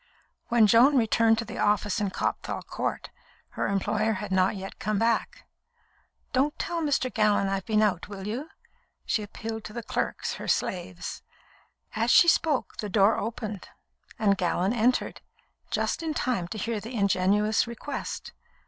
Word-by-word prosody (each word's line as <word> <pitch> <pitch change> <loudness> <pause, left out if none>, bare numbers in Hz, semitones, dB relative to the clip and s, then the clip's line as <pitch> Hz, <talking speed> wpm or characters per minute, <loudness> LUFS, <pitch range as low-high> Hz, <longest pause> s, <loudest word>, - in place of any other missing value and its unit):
When 235 -2 +5
Joan 245 +7 +6
returned 225 -1 +3
to 230 - -2
the - - -7
office 210 0 +1
in 205 - 0
Copthall - - -3
Court, - - -4 0.4
her - - -2
employer 215 +3 0
had 205 0 -5
not 185 +1 +2
yet 195 0 -8
come 215 0 -1
back. 230 +1 0 0.9
"Don't 280 +4 +1
tell 340 -1 -2
Mr. 280 -4 0
Gallon 210 -2 +3
I've 195 -1 -2
been 215 -1 +3
out, 190 -4 0
will 195 -2 -7
you?" 250 +9 -4 0.6
she 220 - 0
appealed 220 +1 -6
to 210 - -8
the 235 - -5
clerks, - - -2
her - - -6
slaves. 180 -1 -2 0.7
As 225 +2 +1
she 340 - +7
spoke, 315 -4 +2
the 210 - -4
door 200 +2 +4
opened, 215 -2 -5 0.5
and 205 -3 +3
Gallon 180 +3 +1
entered, 245 +2 +1 0.5
just - - -1
in 320 -2 -3
time 240 -12 -1
to 215 - -6
hear 225 +1 -2
the 230 +4 -8
ingenuous 205 +2 +2
request. 235 +4 -6
215 Hz, 155 wpm, -27 LUFS, 200-235 Hz, 0.9 s, she